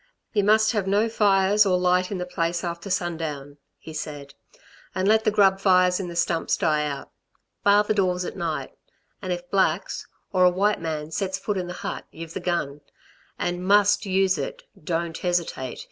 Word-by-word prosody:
"You 205 -3 +2
must 220 +2 +4
have 210 -4 -1
no 205 +3 +2
fires 205 -2 +3
or 185 -3 +2
light 180 0 +2
in 200 - -2
the 180 - -3
place 170 -1 -2
after 170 +2 -5
sundown," 160 -6 -3 0.2
he 160 - -11
said, 145 -2 -6 0.6
"and 190 +1 0
let 220 +1 +4
the - - +5
grub 195 -2 +4
fires 185 -1 +4
in 190 - -4
the 170 - -7
stumps 170 -1 0
die 150 -2 +1
out. 140 -1 -6 0.5
Bar 205 +1 +5
the 215 - 0
doors 185 -3 0
at - - -6
night. 165 -5 -3 0.5
And 185 -2 -4
if 175 0 -4
blacks, 190 -2 0 0.3
or 185 -1 +4
a 180 - +7
white 200 +3 +1
man 155 -1 -4
sets 190 +2 -2
foot 205 +1 -3
in 180 -2 -3
the 175 - -5
hut - - -4
y've 165 0 -9
the - - -3
gun. 150 -5 -2 0.6
And 175 +1 -2
must 205 +1 +4
use 190 -2 +2
it! 140 - -5 0.2
Don't 165 0 -2
hesitate. 170 -8 -2
180 Hz, 190 wpm, -24 LUFS, 165-195 Hz, 0.6 s, a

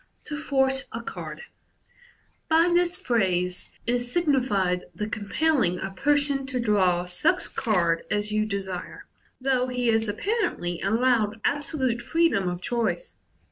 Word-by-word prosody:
To 300 - -5
"Force'' 270 -2 +1
a 230 +1 -5
Card. - - -7 0.5
— 485 -1 -31
By 330 +2 +4
this 350 0 +2
phrase 180 -6 0 0.2
is 245 +1 0
signified 245 - +1
the 210 - -3
compel 275 +9 0
ling 180 -5 +1
a 195 - -4
person 285 +4 +1
to 260 -2 -2
draw 190 -6 +2
such 310 - +1
card 175 -8 +1
as 210 0 -1
you 215 0 +1
desiie, 190 -3 -5 0.4
though 255 -1 +1
he 250 -1 0
is 225 -1 +2
apparently 205 - -1
allowed 225 0 +2
absolute 275 -5 0
freedom 325 - +2
of 175 0 -5
choice. 240 - -2
235 Hz, 140 wpm, -26 LUFS, 195-285 Hz, 0.5 s, By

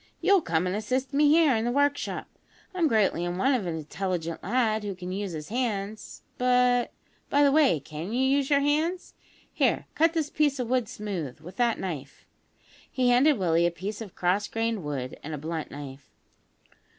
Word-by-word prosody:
You'll 395 -2 +4
come 165 - 0
and 180 +1 -1
assist 255 +5 -2
me 290 +1 +4
here 310 -4 +5
in 220 - 0
the 240 - 0
workshop. 285 +2 0 0.5
I'm 350 -3 +2
greatly 210 - +2
in 175 0 -3
want 265 +7 +3
of 210 -8 -2
an 165 - -2
intelligent 170 +1 -4
lad 220 0 +1
who 200 -2 -4
can 180 0 -7
use 195 -1 -3
his 155 -1 -6
hands; 215 -3 -3 0.2
but, 250 -1 +3 0.4
by 285 +1 +4
the 280 - +5
way, 280 - +4
can 155 +7 -7
you 250 +3 +1
use 275 0 +2
your 280 -1 +4
hands? 315 +5 0 0.4
Here, - - +1
cut 325 +1 +3
this 315 -3 -1
piece 290 -2 +1
of 245 -2 -3
wood 250 -4 +1
smooth, 185 - -5
with 175 +4 -11
that 240 -2 +1
knife." 150 -7 -6 0.7
He 255 -1 +1
handed 265 +4 +5
Willie 170 -3 +2
a - - +2
piece 200 +5 -6
of 205 -5 -9
cross 185 +3 +1
grained 225 -3 -2
wood 135 -4 -5
and 155 +1 -5
a - - -6
blunt 160 +2 -4
knife. 140 -1 -9
220 Hz, 190 wpm, -27 LUFS, 175-265 Hz, 0.7 s, here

